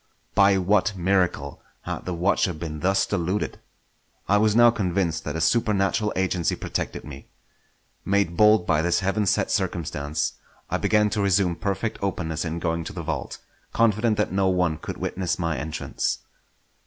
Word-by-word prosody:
By 100 0 +5
what 100 +2 +1
miracle 95 0 0 0.2
had - - -5
the 90 - -3
watcher 90 +1 +1
been 75 -1 -6
thus 95 +4 +2
deluded? 95 +1 -2 0.7
I 100 - +4
was 105 0 +3
now 120 0 +7
convinced 90 -6 -1
that 75 - -3
a 80 - -2
supernatural 105 +1 +1
agency 90 -3 0
protected - - -4
me. 70 -1 -10 0.8
Made 100 -3 +1
bold 105 -1 +5
by 75 - +2
this 90 +4 +1
heaven 100 +2 0
sent - - +1
circumstance, 75 +3 -2 0.4
I - - +1
began 105 -1 +2
to 105 - 0
resume 95 -3 +2
perfect 100 +3 -3
openness 85 -5 -2
in 80 0 -3
going 85 -1 -1
to 100 - -6
the 90 -3 -5
vault; - - -4 0.4
confident 115 -1 +2
that 105 - 0
no 95 0 +1
one 90 -4 +1
could - - -6
witness 95 -2 -2
my 85 -3 -1
entrance. 75 +3 -2
95 Hz, 160 wpm, -24 LUFS, 85-105 Hz, 0.8 s, now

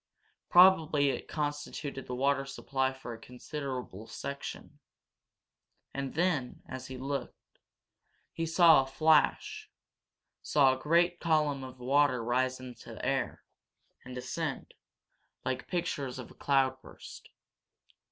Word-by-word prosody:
Probably 160 -6 +6
it - - -5
constituted 145 -2 -4
the 125 - -3
water 135 +2 +2
supply 135 -1 -1
for 130 -2 -8
a 115 - -10
considerable 125 -4 -6
section. 140 +1 -7 1.1
And 135 -1 -4
then, 160 -7 0
as 130 0 -7
he 130 - -7
looked, 135 +2 -6 0.7
he 165 0 -2
saw 165 -3 +7
a 135 - -5
flash 155 +2 +2 0.7
saw 135 -3 +4
a 130 - -11
great 175 +3 +3
column 150 -4 +1
of 130 0 -9
water 130 -1 +2
rise 130 +2 0
in 130 -1 -8
the - - -10
air, - - -1 0.6
and 125 0 -9
descend, 125 - -4 0.7
like 130 -1 -2
pictures 145 -8 -2
of 125 - -8
a - - -13
cloudburst. 135 -2 -2
135 Hz, 120 wpm, -31 LUFS, 130-150 Hz, 1.1 s, saw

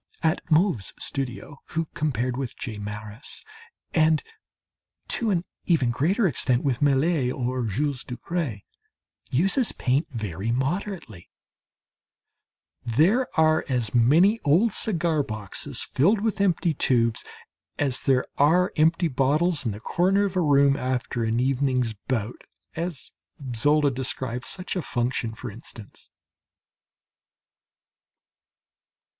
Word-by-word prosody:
At 160 +1 +1
Mauve's 160 - +2
studio 135 +1 -5
who 165 +1 -2
compared 125 -4 -1
with 130 -2 -5
J. 110 -5 -6
Maris, 105 +4 -7 0.5
and 160 -1 +3 0.9
to 230 - +3
an 180 -3 0 0.2
even 145 -9 +3
greater 180 - +1
extent 125 -3 +1
with 130 -4 -1
Millet 140 -1 +2
or 125 -1 -2
Jules 135 +5 -2
Dupré, 125 - -4 0.7
uses 195 - +3
paint 135 +5 0
very 110 - -4
moderately 135 - -3 1.5
there 165 - +3
are 155 0 +4
as 120 -5 -1
many 160 - +4
old 185 +10 +3
cigar 170 -6 +1
boxes 110 +3 -3
filled 195 - +2
with 215 -2 -1
empty 175 -3 +2
tubes 115 -5 +1 0.5
as 135 -4 +1
there 130 -2 +2
are 175 +6 +4
empty 165 +3 +3
bottles 145 +2 +1
in - - 0
the 100 - -7
corner 190 - +2
of 195 -2 -4
a 185 - +2
room 140 -3 +4
after 125 -2 -2
an 115 +1 0
evening's 130 -2 +1
bout 120 -3 -2 0.3
(as 165 -3 -4 0.4
Zola 145 +4 +3
describes 125 -1 -3
such 185 0 -3
a 180 - -1
function, 120 -4 -2
for 120 0 -7
instance). 110 0 -11
140 Hz, 115 wpm, -25 LUFS, 120-165 Hz, 1.5 s, are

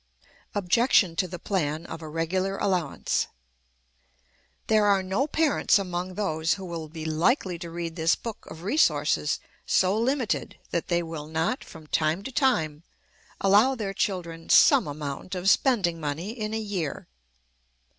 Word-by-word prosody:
Objection 200 -2 +3
to 185 +2 0
the 180 0 -7
Plan 160 -4 -2
of 165 -1 -7
a 155 - -7
regular 185 +5 -1
Allowance. 180 -7 0 1.4
There 215 -1 +3
are 200 -2 +3
no 195 +10 0
parents 310 -6 +3
among 180 -1 -3
those 160 -5 0
who 195 -1 -8
will 165 -3 -6
be 160 0 -7
likely 175 - +1
to 170 -1 -6
read 165 -1 -5
this 165 -1 +2
book 230 -3 -8
of 160 - -10
resources 150 - +2 0.3
so 190 +1 +2
limited 245 +1 -1
that 170 - -1
they 175 -1 +1
will 160 -2 -6
not, 160 - -1
from 160 -1 -13
time 155 +4 0
to 265 - -6
time, 160 - +1 0.6
allow 210 +7 +5
their 205 -5 -3
children 170 -5 -3
some - - +6
amount 145 +4 -5
of 180 +1 -3
spending 195 - +3
money 155 +6 -3
in 215 -2 -4
a - - -1
year. 195 -9 -4
180 Hz, 150 wpm, -26 LUFS, 160-205 Hz, 1.4 s, some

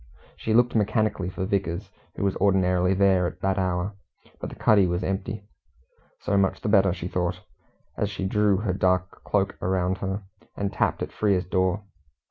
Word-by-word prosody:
She 110 - -1
looked 120 +1 +4
mechanically 110 -3 +1
for 95 0 -4
Vickers, 95 -1 -2 0.2
who - - -3
was 100 -1 +1
ordinarily 90 -1 +2
there 95 -2 +3
at - - -8
that 95 0 +1
hour, 95 +2 -1 0.5
but - - -5
the - - -10
cuddy 100 -4 +4
was 90 +1 -1
empty. 95 +2 -3 0.8
So 100 - 0
much 95 -1 +1
the - - -2
better, 100 -2 +5
she 90 -1 -4
thought, 90 0 -2 0.6
as 105 - 0
she 100 -2 -4
drew 105 0 +2
her 100 -2 -1
dark 90 0 0
cloak 100 -1 0
around 95 0 0
her, 95 +1 -3 0.3
and 100 -1 -2
tapped - - 0
at - - -5
Frere's 100 -4 +1
door. 95 +2 0
95 Hz, 175 wpm, -25 LUFS, 90-100 Hz, 0.8 s, better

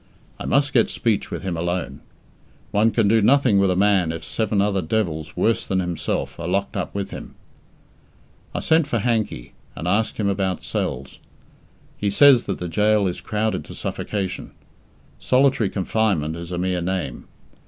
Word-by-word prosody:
I - - -5
must 140 +1 +2
get 115 - +4
speech 110 -4 0
with - - -5
him 95 -3 -2
alone. 85 +1 -3 0.7
One 105 +2 +3
can 115 -2 +2
do 110 +2 +4
nothing 125 -2 +4
with 100 -1 +3
a 90 - +1
man 95 -3 +3
if 80 - -6
seven 110 -2 -1
other 100 -1 +1
devils 80 -4 -2
worse 115 - +2
than 95 - -1
himself 85 -5 -3
are 85 - -4
locked 100 +4 -1
up 95 -1 -3
with 100 -1 -3
him. - - -9 1.2
I - - -1
sent 160 -1 +3
for 120 - 0
Hankey, 110 - -1 0.2
and 85 - -5
asked 110 +4 +1
him 105 - 0
about 95 -2 -1
cells. 70 0 -4 0.8
He 105 - 0
says 130 +3 +6
that 100 - -2
the 90 - -4
gaol 105 +3 +2
is 90 - -4
crowded 105 -3 -1
to - - -10
suffocation. 100 -3 -4 0.7
"Solitary 130 -4 +3
confinement" 95 -6 0
is 85 +1 -7
a 90 - -2
mere 90 0 -1
name. 90 -8 -3
100 Hz, 170 wpm, -22 LUFS, 90-110 Hz, 1.2 s, says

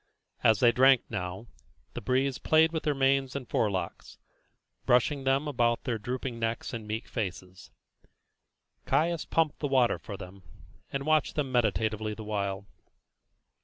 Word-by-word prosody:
As 110 -2 +4
they 120 -2 +6
drank 130 0 +5
now, 90 +5 -4 0.5
the - - -5
breeze 130 +4 0
played 160 +1 +4
with 160 -1 -2
their 150 -2 0
manes 135 -1 +1
and 135 -3 -5
forelocks, 95 -5 -2 0.7
brushing 135 +3 +2
them 135 +3 +2
about 120 -4 +1
their 120 -3 -2
drooping 125 +1 -4
necks 115 0 -3
and 110 -2 -6
meek 110 +2 -4
faces. 95 -4 -6 1.2
Caius 170 +1 +1
pumped 160 -3 0
the 145 - -1
water 130 -3 +2
for 100 - -8
them, 95 +1 -11 0.5
and 140 0 -3
watched 155 -1 +2
them 140 -3 -1
meditatively 110 -2 0
the 110 - -8
while. 100 -2 -3
120 Hz, 145 wpm, -29 LUFS, 105-135 Hz, 1.2 s, they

